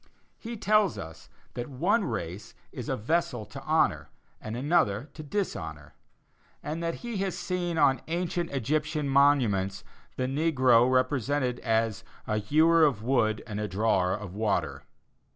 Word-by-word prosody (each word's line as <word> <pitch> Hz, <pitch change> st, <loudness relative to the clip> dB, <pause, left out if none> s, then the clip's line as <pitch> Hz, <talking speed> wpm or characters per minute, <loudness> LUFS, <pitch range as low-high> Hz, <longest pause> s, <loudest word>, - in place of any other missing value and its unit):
He 235 Hz, 0 st, -6 dB
tells 210 Hz, -2 st, +2 dB
us 80 Hz, 0 st, -9 dB, 0.2 s
that 120 Hz, +2 st, -5 dB
one 185 Hz, -, +1 dB
race 95 Hz, -, -5 dB, 0.2 s
is -, -, -6 dB
a -, -, 0 dB
vessel 125 Hz, -2 st, -1 dB
to -, -, -10 dB
honor, -, -, +1 dB, 0.3 s
and 110 Hz, +2 st, -5 dB
another 140 Hz, -, +1 dB
to -, -, -8 dB
dishonor; 80 Hz, -, -4 dB, 0.7 s
and 155 Hz, +3 st, -4 dB
that 165 Hz, 0 st, -2 dB
he 235 Hz, -3 st, -3 dB
has 190 Hz, -1 st, -2 dB
seen 175 Hz, -2 st, -2 dB
on 140 Hz, -3 st, +3 dB
ancient 175 Hz, 0 st, -2 dB
Egyptian 150 Hz, +3 st, -1 dB
monuments 120 Hz, -9 st, +2 dB, 0.3 s
the 130 Hz, -, -1 dB
negro 130 Hz, -4 st, +3 dB
represented 130 Hz, 0 st, +1 dB
as 115 Hz, -1 st, 0 dB, 0.2 s
"a 105 Hz, 0 st, 0 dB
hewer 160 Hz, +9 st, +4 dB
of 130 Hz, -9 st, +2 dB
wood 115 Hz, -4 st, +1 dB
and 105 Hz, -3 st, -5 dB
a 105 Hz, -, -2 dB
drawer 95 Hz, -2 st, +1 dB
of 105 Hz, -3 st, -6 dB
water." 95 Hz, -10 st, -1 dB
130 Hz, 145 wpm, -28 LUFS, 105-160 Hz, 0.7 s, hewer